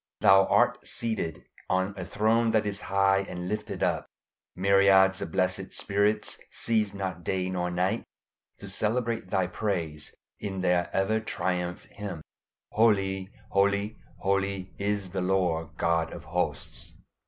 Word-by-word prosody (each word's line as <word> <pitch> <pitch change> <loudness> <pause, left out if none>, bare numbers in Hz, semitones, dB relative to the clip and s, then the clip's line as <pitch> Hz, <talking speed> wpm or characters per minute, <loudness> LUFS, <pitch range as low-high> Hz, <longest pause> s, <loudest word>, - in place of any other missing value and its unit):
Thou 95 0 +7
art - - +2
seated 110 -9 -3 0.2
on 95 +2 +1
a 95 - -5
throne 115 +5 +2
that 110 -1 +2
is 100 0 -3
high 95 0 +4
and 90 0 -5
lifted 105 +2 -3
up; - - 0 0.5
myriads 95 0 +5
of - - -4
blessed 95 +2 0
spirits 105 +1 +1
cease 110 -3 0
not 95 -3 -4
day 95 +1 -1
nor 90 -1 -1
night 90 +5 0 0.5
to - - -9
celebrate 115 -2 -1
Thy 95 -1 +2
praise 85 -6 -3 0.2
in 95 -2 -4
their 90 -1 +2
ever 95 +3 +1
triumphant 90 -4 -3
hymn, 95 -6 -5 0.5
"Holy, 95 -4 +2 0.2
holy, 100 +2 +1 0.2
holy, 95 -2 -1
is 100 -2 -1
the 95 0 -2
Lord 85 -4 0
God 85 -1 +1
of - - -8
hosts." - - -3
95 Hz, 135 wpm, -28 LUFS, 90-105 Hz, 0.5 s, Thou